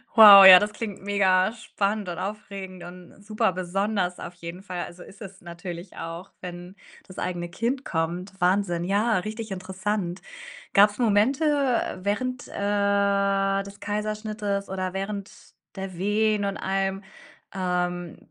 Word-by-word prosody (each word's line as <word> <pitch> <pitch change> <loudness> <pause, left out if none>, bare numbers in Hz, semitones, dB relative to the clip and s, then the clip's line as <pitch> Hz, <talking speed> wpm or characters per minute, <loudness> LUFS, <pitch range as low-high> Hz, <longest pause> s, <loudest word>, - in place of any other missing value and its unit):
Wow, 205 -3 +11
ja, 185 -1 +12
das 210 +2 -2
klingt 210 -4 -6
mega 195 -1 +2
spannend 210 -3 -3
und 170 - -5
aufregend 195 -2 -7
und 180 +3 -13
super 210 -2 0
besonders 185 0 -2
auf - - -8
jeden 175 +2 -9
Fall, 180 -3 -5
also, 175 +1 -12
ist 200 +3 -16
es 195 -1 -10
natürlich 175 +1 -8
auch, 165 +3 -7
wenn 175 +1 -9 0.3
das 185 - -13
eigene 175 -1 -3
Kind 245 +8 -2
kommt. 175 +3 -3
Wahnsinn. 180 -1 +1
Ja, 205 +2 +1
richtig 215 +2 -6
interessant. 190 0 -3 0.5
Gab's 205 +1 +5
Momente, 235 +7 +2
äh, 275 -10 0
während, 245 +5 -2
äh, 200 -1 +1
des 200 0 -12
Kaiserschnittes 210 -1 -3
oder 185 -1 -3
während 195 +1 -4 0.4
der 190 -2 -6
Wehen 210 +2 +1
und 200 0 -3
allem, 195 0 -2 0.5
ähm, 180 -2 -2
195 Hz, 140 wpm, -25 LUFS, 180-210 Hz, 0.5 s, ja